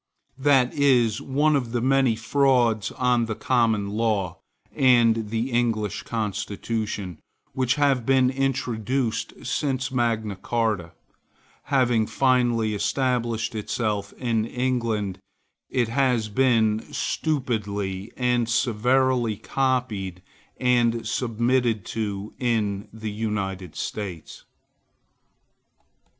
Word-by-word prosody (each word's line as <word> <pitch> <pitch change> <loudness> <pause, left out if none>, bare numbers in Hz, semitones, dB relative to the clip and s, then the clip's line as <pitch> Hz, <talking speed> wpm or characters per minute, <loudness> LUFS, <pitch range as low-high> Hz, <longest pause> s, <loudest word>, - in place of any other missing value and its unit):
That 135 -3 +3
is 125 -6 +3
one 145 +3 +2
of 125 -4 -2
the 120 - +1
many 130 -1 +3
frauds 120 -2 +2
on 125 -2 +2
the 110 - -3
Common 110 -5 +1
Law, 105 -5 -1 0.4
and 115 -4 +4
the 115 +4 -2
English 110 -4 0
constitution, 105 -3 -3 0.3
which 130 -1 +1
have 140 -4 +2
been 130 +1 +3
introduced 125 -3 -2
since 130 +1 -1
Magna 115 -5 0
Carta. 105 -5 -1 0.7
Having 120 -5 +2
finally 120 -4 +2
established 115 0 -1
itself 105 -1 -2
in 115 -3 -1
England, 115 -6 -1 0.5
it 120 -3 0
has 125 -3 +1
been 110 -2 +3
stupidly 105 - -2
and 125 -2 +1
servilely 125 0 +2
copied 110 -10 -1 0.3
and 120 -2 +2
submitted 120 -2 0
to 105 -2 -4
in 105 -4 0
the 110 -1 -6
United 100 -5 -3
States. 95 -7 -6
115 Hz, 95 wpm, -24 LUFS, 105-125 Hz, 0.7 s, and